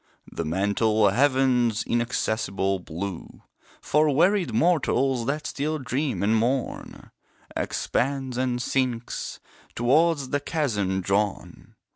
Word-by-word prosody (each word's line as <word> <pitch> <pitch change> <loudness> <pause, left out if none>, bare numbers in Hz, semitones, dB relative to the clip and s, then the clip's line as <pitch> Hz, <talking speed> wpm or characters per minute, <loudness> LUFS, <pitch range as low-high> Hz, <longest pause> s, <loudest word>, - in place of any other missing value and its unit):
The - - -4
mental 100 +5 +2
Heaven's 125 -2 +2
inaccessible 110 -5 -1
blue, 90 +1 -7 0.4
For 150 +1 +2
wearied 180 +6 +2
mortals 135 -3 +1
that 150 +2 -2
still 155 +2 -2
dream 135 -2 -2
and 110 +2 +3
mourn, 120 +3 -2 0.4
Expands 135 -1 -1
and 125 -1 -1
sinks; 125 -1 -2 0.4
towards 140 +3 +2
the 145 - 0
chasm 105 - -1
drawn. 100 +2 -2
125 Hz, 100 wpm, -25 LUFS, 105-140 Hz, 0.4 s, and